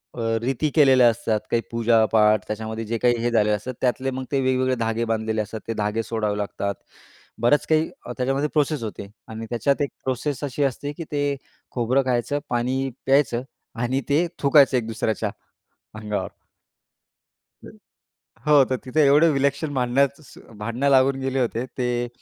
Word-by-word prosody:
अ, 115 Hz, -1 st, -1 dB
रीती 135 Hz, +4 st, 0 dB
केलेल्या 130 Hz, -5 st, +6 dB
असतात 115 Hz, -1 st, -1 dB
काही 115 Hz, -, +2 dB
पूजा 115 Hz, -1 st, +3 dB
पाठ 105 Hz, -2 st, +4 dB
त्याच्यामध्ये 110 Hz, +1 st, -4 dB
जे 115 Hz, +2 st, -2 dB
काही 120 Hz, +1 st, +3 dB
हे 120 Hz, +1 st, 0 dB
झाले 105 Hz, -2 st, +3 dB
असतात, 105 Hz, +5 st, -2 dB
त्यातले 130 Hz, +1 st, 0 dB
मग 130 Hz, 0 st, -4 dB
ते 140 Hz, -, +1 dB
वेगवेगळे 130 Hz, 0 st, +1 dB
धागे 115 Hz, 0 st, -1 dB
बांधलेले 110 Hz, -1 st, -1 dB
असतात 110 Hz, +1 st, -6 dB
ते 115 Hz, -, -1 dB
धागे 105 Hz, +1 st, -1 dB
सोडावे 110 Hz, -2 st, -2 dB
लागतात. 100 Hz, -1 st, -3 dB, 0.7 s
बरंच 120 Hz, +5 st, +3 dB
काही 155 Hz, 0 st, +2 dB, 0.2 s
अ, 120 Hz, -, -6 dB
त्याच्यामध्ये 135 Hz, +3 st, 0 dB
प्रोसेस 150 Hz, -4 st, +1 dB
होते 105 Hz, -2 st, -6 dB, 0.2 s
आणि 110 Hz, 0 st, -7 dB
त्याच्यात 125 Hz, +5 st, 0 dB
एक 140 Hz, -, 0 dB
प्रोसेस 130 Hz, +2 st, -2 dB
अशी 145 Hz, +1 st, -1 dB
असते, 140 Hz, +2 st, -2 dB
की 165 Hz, -, -7 dB
ते 145 Hz, -1 st, 0 dB, 0.4 s
खोबरं 125 Hz, +3 st, +1 dB
खायचं 130 Hz, +3 st, 0 dB
पाणी 130 Hz, +3 st, 0 dB, 0.2 s
प्यायचं 135 Hz, -3 st, +2 dB, 0.4 s
आणि 125 Hz, +3 st, 0 dB
ते 165 Hz, +5 st, 0 dB
थुकायचं 140 Hz, -2 st, +5 dB
एक-दुसऱ्याच्या 110 Hz, -2 st, -2 dB, 0.7 s
अंगावर. 105 Hz, -1 st, -3 dB, 1.4 s
हं. -, -, -10 dB, 0.8 s
हो. 145 Hz, -2 st, +7 dB
तर 130 Hz, 0 st, -2 dB
तिथे 140 Hz, +4 st, +1 dB
एवढं 150 Hz, +4 st, +5 dB
विलक्षण 140 Hz, +2 st, 0 dB
भांडण्याचं 135 Hz, +4 st, +1 dB
स 135 Hz, -, -16 dB, 0.2 s
भांडणं 115 Hz, +6 st, -1 dB
लागून 135 Hz, 0 st, +4 dB
गेले 135 Hz, 0 st, -1 dB
होते. 120 Hz, 0 st, -1 dB
ते 125 Hz, -1 st, -2 dB
125 Hz, 160 wpm, -23 LUFS, 115-140 Hz, 1.4 s, हो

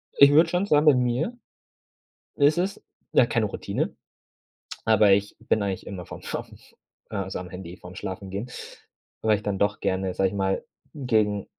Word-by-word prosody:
Ich 140 Hz, 0 st, +8 dB
würde 160 Hz, +3 st, +6 dB
schon 180 Hz, +3 st, +1 dB
sagen, 150 Hz, -5 st, +3 dB
bei 150 Hz, -, +8 dB
mir 125 Hz, -, 0 dB, 1.0 s
ist 145 Hz, +2 st, +4 dB
es 190 Hz, +2 st, -1 dB, 0.3 s
ja, -, -, +6 dB
keine -, -, 0 dB
Routine. -, -, -3 dB, 0.9 s
Aber, 110 Hz, -2 st, +5 dB
ich 100 Hz, +1 st, +2 dB
bin 110 Hz, -2 st, +1 dB
eigentlich 95 Hz, -2 st, -3 dB
immer 90 Hz, -4 st, -7 dB
vorm -, -, -9 dB
Schlafen, -, -, -6 dB, 0.5 s
äh, -, -, -4 dB
also 95 Hz, -1 st, -3 dB
am 90 Hz, -, -9 dB
Handy 90 Hz, -1 st, -8 dB
vorm 90 Hz, +1 st, -12 dB
Schlafengehen, 95 Hz, +4 st, -5 dB, 0.7 s
weil 110 Hz, -1 st, +4 dB
ich 100 Hz, -, -9 dB
dann 100 Hz, -2 st, -2 dB
doch 105 Hz, +1 st, +1 dB
gerne, 95 Hz, 0 st, -1 dB
sage 95 Hz, -1 st, +2 dB
ich 100 Hz, -, -7 dB
mal, 95 Hz, -1 st, 0 dB, 0.3 s
gegen 110 Hz, -8 st, +1 dB
105 Hz, 170 wpm, -25 LUFS, 95-140 Hz, 1.0 s, Ich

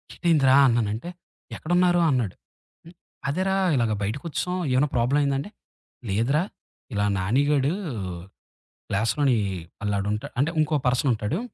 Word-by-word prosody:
ఎటైందిరా! 145 Hz, -6 st, +4 dB
అన్నానంటే, 115 Hz, +4 st, 0 dB, 0.5 s
"ఎక్కడన్నారు" 175 Hz, +1 st, +2 dB
అన్నాడు. 125 Hz, -9 st, 0 dB, 0.5 s
"హ్మ్, 170 Hz, +2 st, -14 dB, 0.3 s
అదేరా 185 Hz, +6 st, 0 dB, 0.2 s
ఇలాగ 115 Hz, -4 st, +1 dB
బయటకొచ్చెసాం, 145 Hz, -, -3 dB, 0.2 s
ఏమైనా 140 Hz, +3 st, +2 dB
ప్రాబ్లమైందా" 140 Hz, +3 st, +2 dB
అంటె, 205 Hz, -, -7 dB, 0.6 s
"లేదురా 120 Hz, -, +1 dB, 0.5 s
ఇలా 105 Hz, 0 st, +1 dB
నానిగాడు, 140 Hz, -, +2 dB, 1.2 s
క్లాస్‌లోని 115 Hz, +5 st, +1 dB, 0.5 s
అల్లాడుంటా" 105 Hz, +1 st, -1 dB
అంటే 145 Hz, +5 st, +2 dB
ఇంకో 155 Hz, 0 st, +1 dB
పర్సనుంటాడు, 125 Hz, -, +1 dB
135 Hz, 100 wpm, -25 LUFS, 115-155 Hz, 1.2 s, ఎటైందిరా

